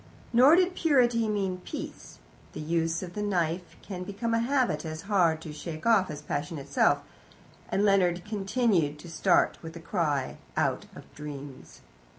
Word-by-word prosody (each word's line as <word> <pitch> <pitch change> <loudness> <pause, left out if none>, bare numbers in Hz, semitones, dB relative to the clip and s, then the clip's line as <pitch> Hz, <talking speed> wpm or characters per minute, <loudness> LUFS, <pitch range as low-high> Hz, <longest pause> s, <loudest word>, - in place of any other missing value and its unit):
Nor 260 +7 +7
did 365 0 +3
purity 245 -10 +3
mean 195 -3 -1
peace. - - -8 0.4
The - - -7
use 165 +2 -1
of 175 -1 -7
the 210 - -4
knife 180 -3 -1
can 180 -3 -6
become 205 +5 -3
a 230 - +3
habit 240 - +1
as 155 0 -6
hard 175 -6 +2
to 155 -2 -7
shake 155 +1 -7
off 220 -5 +4
as 150 -1 -7
passion 165 +3 -3
itself, 140 - +2 0.7
and 200 - +1
Leonard 180 -3 +3
continued 200 - +1
to 170 +3 -11
start 175 +2 +2
with 165 0 -9
a - - -7
cry 165 -6 -1 0.2
out - - 0
of - - -10
dreams. 145 -2 -9
180 Hz, 160 wpm, -28 LUFS, 160-215 Hz, 0.7 s, Nor